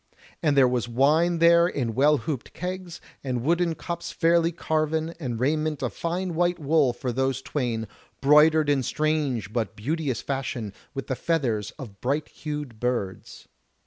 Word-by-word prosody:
And 145 -3 +2
there 130 -2 +7
was 125 -2 0
wine 155 +8 +3
there 170 +1 +6
in 125 -9 -2
well 145 +5 +4
hooped 145 -4 -5
kegs, 180 -1 -5 0.2
and 125 -3 -2
wooden 170 +2 +1
cups 170 +1 -5
fairly 170 0 +3
carven, 160 0 -1
and 120 -7 -3
raiment 155 +3 0
of - - -2
fine 175 +2 -2
white 175 +1 +1
wool 150 -3 +3
for 120 +1 -4
those 130 +1 0
twain, 120 -5 -2 0.3
broidered 150 +2 +5
in 145 -2 +3
strange 140 -7 -1
but 115 -2 -2
beauteous 140 +1 -2
fashion 125 -6 -3 0.2
with 135 - -4
the 130 - -2
feathers 120 -11 0
of 110 -9 -10
bright 145 +4 -1
hued 150 -7 -6
birds. 120 -6 -3
145 Hz, 155 wpm, -25 LUFS, 125-165 Hz, 0.3 s, there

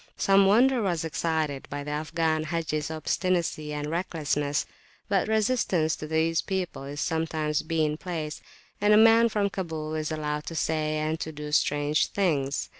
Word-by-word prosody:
Some 195 0 +4
wonder 245 +5 +4
was 175 -5 -1
excited 160 -3 -2
by 145 0 -4
the 150 - -5
Afghan 155 +1 -1
Haji's 155 -2 -2
obstinacy 160 -1 -1
and 150 0 -3
recklessness; 150 -3 -1 0.4
but 195 -1 +1
resistance 215 -7 +1
to 155 - -6
these 160 +1 +1
people 185 -7 -3
is 145 +1 -6
sometimes 160 -2 -1
bien 155 -2 0
place, 160 -3 -5 0.4
and 210 +1 +5
a - - +7
man 225 +1 +6
from 205 -2 0
Kabul 160 -5 -4
is 155 0 -2
allowed 150 -1 -3
to 165 - -5
say 155 -1 0
and 155 +1 -1
to 160 - -4
do 150 -1 -7
strange 145 0 +2
things. 145 -8 -1
160 Hz, 160 wpm, -27 LUFS, 150-180 Hz, 0.4 s, a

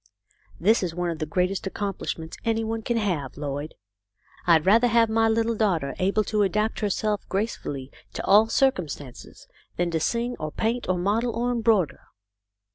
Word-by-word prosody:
That 215 +7 +4
is 175 -3 -3
one 175 -1 -1
of 160 - -6
the 155 - -2
greatest 185 +4 -1
accomplish 200 0 -3
ments 160 0 -8
any 225 -1 0
one 225 0 -3
can 235 +1 -1
have, 175 - -2
Lloyd. 145 +1 -4 0.7
I'd 165 -3 +5
rather 225 +5 +5
have 230 -1 +3
my 225 0 +3
little 225 +1 +1
daughter 185 -11 0
able 195 +3 +2
to 210 0 0
adapt 210 +3 0
herself 210 0 0
gracefully 145 - -3 0.2
to - - -4
all 210 +3 +6
circumstances, 180 - -2 0.3
than 175 -1 0
to 165 - 0
sing 235 +8 -1
or 155 0 -4
paint 230 +5 -2
or 185 - +2
model 215 +6 0
or 240 +1 0
embroider. 225 - +2
205 Hz, 170 wpm, -25 LUFS, 170-225 Hz, 0.7 s, all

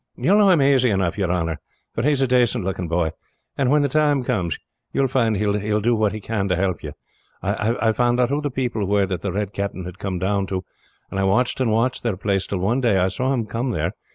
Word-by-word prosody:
"You - - +1
will 205 - +6
know 205 -2 +6
him 175 -6 +5
aisy 135 -2 +4
enough, 95 -4 0
your 95 -4 -1
honor, 85 -3 -1 0.3
for - - -2
he 140 - +2
is 140 -2 +2
a - - +2
dacent 125 -5 +2
looking 95 -2 -3
boy; 85 -1 0 0.4
and 135 -3 +1
when 145 +1 +4
the - - +2
time 145 -1 +2
comes 95 - -1 0.4
you - - +1
will 135 - +3
find 115 -5 +1
he 105 - 0
will 105 +1 0
do 120 +3 +2
what 105 -2 +1
he 110 - -5
can 105 -1 -2
to 90 - +1
help 90 -2 -1
you. - - -7 0.5
I 115 +1 +1
found 120 +2 +1
out 125 -1 +3
who 145 +2 0
the 145 - -1
people 120 -6 -2
were 100 0 +2
that 95 -2 -4
the 100 - -2
Red 100 +1 -3
Captain 100 -2 -4
had 90 +1 -9
come 95 -2 -3
down 95 +2 0
to, 95 -1 -3 0.5
and 95 - -2
I - - +1
watched 120 +8 +1
and 125 - +2
watched 115 +4 +1
their 115 -6 -1
place, 100 -1 -1
till 100 - -2
one 115 +8 +1
day 115 -6 +3
I 95 0 +2
saw 130 +7 -1
him 120 -5 0
come 120 +4 -3
there. 115 - -1
105 Hz, 265 wpm, -22 LUFS, 95-125 Hz, 0.5 s, will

